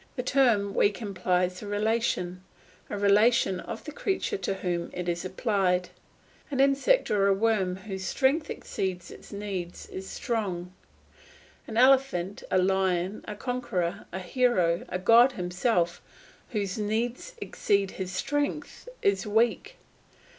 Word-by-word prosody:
The 250 - -2
term 235 -7 +3
weak 205 0 +2
implies 180 -3 -1
a 210 - -7
relation, 205 -4 0 0.5
a 205 - -3
relation 205 -1 +4
of - - -7
the 300 - -7
creature 390 +6 -1
to 195 - -2
whom 175 -2 -2
it 180 0 -4
is 170 0 -1
applied. 185 -2 0 0.6
An 275 -3 -3
insect 275 - +3
or 200 -2 +3
a 200 - +5
worm 200 -3 +1
whose 190 0 -6
strength 280 - +1
exceeds 185 -2 -4
its - - -13
needs 195 -4 -5
is 190 0 -7
strong; 185 -7 -3 0.9
an 220 - -5
elephant, 250 -8 +3
a - - +2
lion, 190 0 +1
a 210 - -5
conqueror, 205 -8 -3
a 185 - -4
hero, 185 -4 +1
a - - -1
god 230 +7 +6
himself, 180 -1 0 0.5
whose 205 -3 -2
needs 235 - -2
exceed 200 -1 0
his 185 -1 -5
strength 290 - -2
is 200 +1 +2
weak. 230 - +1
200 Hz, 135 wpm, -28 LUFS, 185-235 Hz, 0.9 s, god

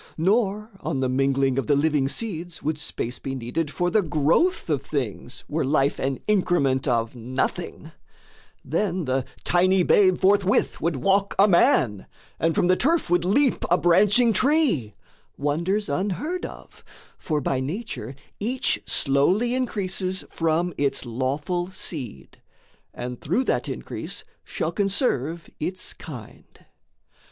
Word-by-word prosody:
Nor 210 +4 +1
on 135 - -2
the 130 - +1
mingling 135 0 +1
of - - -3
the 145 - +4
living 145 -2 +2
seeds 175 -1 -4
Would 150 0 -1
space 125 -4 -4
be 135 0 -4
needed 130 +6 -3
for 175 +3 -1
the 215 - +4
growth 160 - +1
of 150 -5 0
things 130 -4 -4
Were 160 +2 -1
life 140 0 +1
an 135 0 -1
increment 175 -10 +2
of 115 -1 0
nothing: 125 +2 -3 0.7
then 175 +3 -1
The 130 0 0 0.2
tiny 185 +1 +3
babe 185 0 +4
forthwith 200 +1 +2
would 165 0 0
walk 195 +8 +1
a 200 - +6
man, 165 - +3 0.3
And 165 0 +1
from - - +2
the 185 +1 +4
turf 310 - +1
would 175 -1 +3
leap 250 +9 +2
a 175 - +4
branching 205 +7 +4
tree 230 - +2 0.4
Wonders 170 +9 0
unheard 275 - -2
of; - - -14 0.4
for, 155 -2 -1
by 135 -1 -1
Nature, 140 - -5 0.2
each 245 +5 -1
Slowly 180 - +2
increases 190 -7 -1
from 165 +2 0
its 140 -1 0
lawful 140 +9 -2
seed, 140 - -6 0.5
And 125 0 -6
through 190 - +1
that - - -1
increase - - -6 0.2
shall - - -3
conserve 180 - 0
its 185 +4 -2
kind. 125 -10 -12
170 Hz, 135 wpm, -24 LUFS, 135-195 Hz, 0.7 s, a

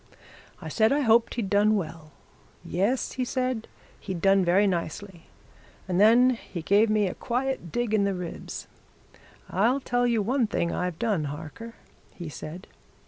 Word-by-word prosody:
I - - -8
said 220 +1 +2
I 290 +1 +2
hoped 230 -2 +3
he'd 230 -5 -2
done 210 +2 +3
well. 160 -4 -5 0.6
Yes, 200 +10 0
he 255 - -2
said, 255 -2 -2 0.3
he'd 185 -4 -5
done 195 +1 +4
very 185 +4 +4
nicely 175 -1 -3 0.6
and 185 +1 +1
then 240 +4 +6
he 195 -8 -6
gave 205 +5 +4
me 215 -1 +2
a 185 - -2
quiet 255 - -3
dig 240 -2 -1
in 210 -2 +3
the 200 -1 0
ribs. 180 -2 -6 0.9
'I'll 230 +9 +2
tell 245 -1 +1
you 230 -3 +1
one 245 +2 +1
thing 170 -5 -1
I've 180 -2 -2
done, 205 -9 0
Harker,' 160 +11 -8 0.4
he 175 -3 -7
said. 160 +5 -8
205 Hz, 160 wpm, -26 LUFS, 180-235 Hz, 0.9 s, then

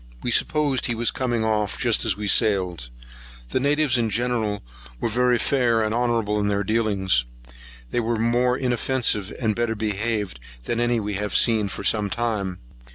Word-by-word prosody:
We 120 - -1
supposed 145 0 +1
he 120 - -1
was 120 +1 +1
coming 120 -4 -1
off 105 -2 0
just 120 -2 +1
as 105 -4 +1
we 105 - -4
sailed.[137 90 - +1 0.5
1] - - -23
The - - 0
natives 145 -1 +2
in 115 -1 +1
general 110 -2 -1 0.4
were - - -1
very 125 +2 +2
fair 120 -4 +2
and 110 0 -1
honourable 115 -3 0
in 105 - 0
their 100 0 0
dealings. 100 - +1 0.7
They - - 0
were 115 0 0
more 120 +2 +2
inoffensive 125 -5 0
and 110 -4 0
better 120 -1 -1
behaved 105 - -2 0.2
than 115 - -2
any 120 0 +1
we 105 -1 -3
had 105 +1 -3
seen 110 -3 +3
for 100 - -6
some 105 0 +2
time. 105 -5 -2
115 Hz, 175 wpm, -23 LUFS, 105-120 Hz, 0.7 s, seen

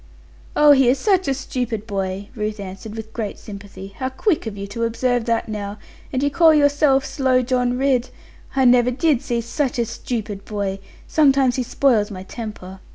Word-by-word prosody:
'Oh, 295 0 +7
he 265 -3 +5
is 260 - +3
such 380 0 +2
a 275 - +2
stupid 245 -5 -3
boy,' 195 -1 -3
Ruth 215 -1 -3
answered 195 +2 -8
with 220 0 -8
great 215 -4 -4
sympathy: 200 -1 -10
'how 260 -1 -2
quick 305 - 0
of 205 -2 -6
you 200 - -5
to 210 +4 -4
observe 245 +1 0
that 230 -1 0
now: 205 -1 -5 0.3
and 260 0 -1
you 285 - +1
call 325 -1 +5
yourself 285 -2 +3
"Slow 260 -2 +1
John 250 0 0
Ridd!" 260 -2 +1 0.5
I 265 -1 +3
never 245 0 +5
did 275 +1 +1
see 240 -4 -1
such 260 +3 -2
a 235 - +1
stupid 220 -3 -5
boy: 200 -2 -3 0.3
sometimes 270 -4 +3
he - - +1
spoils 235 -4 +2
my 185 -3 -7
temper. 195 -3 -8
240 Hz, 185 wpm, -21 LUFS, 210-270 Hz, 0.5 s, Oh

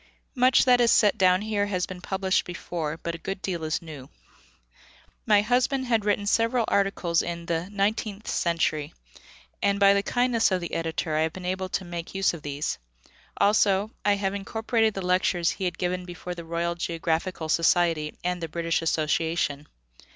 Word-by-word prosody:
Much 255 0 +4
that 250 -1 +5
is 235 - +4
set 210 -2 +4
down 185 +1 +3
here 210 -2 0
has 185 -3 -1
been 180 -1 -9
published 190 0 0
before, 165 -3 -4
but 170 0 -4
a 170 - -7
good 195 +3 -5
deal 175 -4 -3
is 155 +1 -2
new. 150 -5 -10 1.2
My 205 -2 +5
husband 255 +3 +1
had 225 -4 +1
written 205 -1 +1
several 230 +3 +2
articles 195 -4 +1
in 170 0 -5
the 170 +2 -2
Nineteenth 205 +1 -1
Century, 160 -3 -1 0.7
and 200 0 +1
by 200 0 +6
the 200 - +2
kindness 245 +1 +2
of 185 - +1
the 175 - -6
editor 165 -1 -2
I 155 - +2
have 160 0 0
been 185 -1 -8
able 185 +1 -2
to 190 - -2
make 175 +1 -7
use 195 -1 +2
of 170 - -8
these; 145 0 -3 0.6
also 205 0 +3
I 205 -1 +3
have 195 -1 -2
incorporated 220 +2 0
the 195 - -4
lectures 180 -1 +2
he 190 - -4
had 175 -1 -2
given 180 0 -2
before 180 0 -7
the 170 -1 -9
Royal 170 +1 -1
Geographical 170 0 -2
Society 165 -1 +2
and 180 0 -2
the 165 - -4
British 165 +1 -1
Association. 160 -2 0
180 Hz, 180 wpm, -26 LUFS, 170-205 Hz, 1.2 s, by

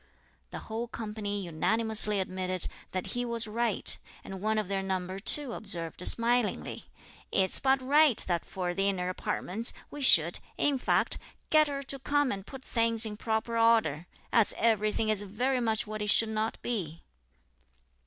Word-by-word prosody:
The - - -7
whole 225 +2 -4
company 210 -3 -5
unanimously 210 +5 +5
admitted 185 -1 -2 0.3
that 185 -1 -3
he 245 - -1
was 235 -1 +2
right; 225 -1 +2 0.3
and 190 -1 -8
one 215 +1 0
of 215 -3 -1
their 195 0 -2
number 190 0 -4
too 265 +4 +1
observed 175 -4 -4
smilingly, 235 -1 0 0.5
"It's 190 -1 +2
but 265 -1 +1
right 290 -1 +4
that 175 -2 -1
for 180 -2 -4
the 195 +2 0
inner 180 -2 -2
apartments, 195 +4 -3 0.2
we 290 - -8
should, 170 - +5 0.2
in 285 -2 +1
fact, - - +1 0.3
get 310 -1 +5
her 280 -1 -4
to 275 0 -6
come 290 0 0
and 195 0 -6
put 265 -1 -11
things 230 -1 +2
in 210 -1 -5
proper 220 +2 -2
order, 215 -9 +2 0.3
as 230 -4 +3
everything 215 -1 +1
is 215 -2 0
very 245 +6 -1
much 220 -1 0
what 215 0 -6
it 210 - -2
should 225 +1 +3
not 220 +1 -2
be." 175 -9 -4
220 Hz, 165 wpm, -29 LUFS, 190-235 Hz, 0.5 s, unanimously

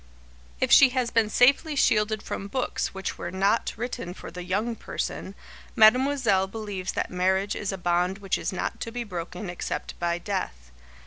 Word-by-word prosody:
If - - 0
she 275 - +9
has 245 -2 +1
been 225 -2 +2
safely 275 +7 +4
shielded 215 -4 +2
from 200 - -5
books 250 +5 -1
which 190 0 -5
were 175 - -4
not 195 +5 +1
written 220 -6 -5
for - - -9
The 180 - -7
Young 205 +6 -1
Person, 200 -2 -5 0.4
Mademoiselle 230 -3 +4
believes 200 -3 -5
that - - -2
marriage 190 +3 +1
is 205 - -3
a 195 - -4
bond 180 +1 0
which 195 -3 -2
is - - -2
not 185 - -3
to 230 - -5
be 240 +1 -3
broken 180 -1 -6
except 175 0 -4
by 170 0 0
death. 65 - -4
200 Hz, 175 wpm, -26 LUFS, 180-230 Hz, 0.4 s, she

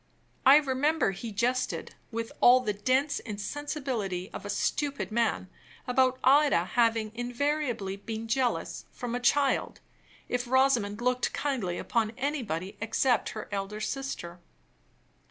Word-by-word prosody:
I 270 - +10
remember 290 -2 +2
he 220 +4 -6
jested, 245 +5 -1 0.2
with 230 0 -4
all 250 +1 +7
the 210 -4 -1
dense 260 +8 +1
insensibility 215 - -4
of - - -6
a - - -7
stupid 280 +5 -1
man, 230 -4 0 0.4
about 255 0 +2
Ida 275 - +5
having 225 -2 +2
invariably 245 -4 -2
been 220 +2 -6
jealous, 245 +1 -1
from 245 -2 -5
a 245 - -1
child, 275 +2 +2 0.5
if 245 0 -2
Rosamond 245 -5 +2
looked 250 +1 0
kindly 230 -12 -1
upon 225 +2 0
anybody 220 - -3
except 230 +2 +1
her 215 - -6
elder 200 +1 -3
sister. 215 -8 -4
245 Hz, 125 wpm, -29 LUFS, 210-270 Hz, 0.5 s, I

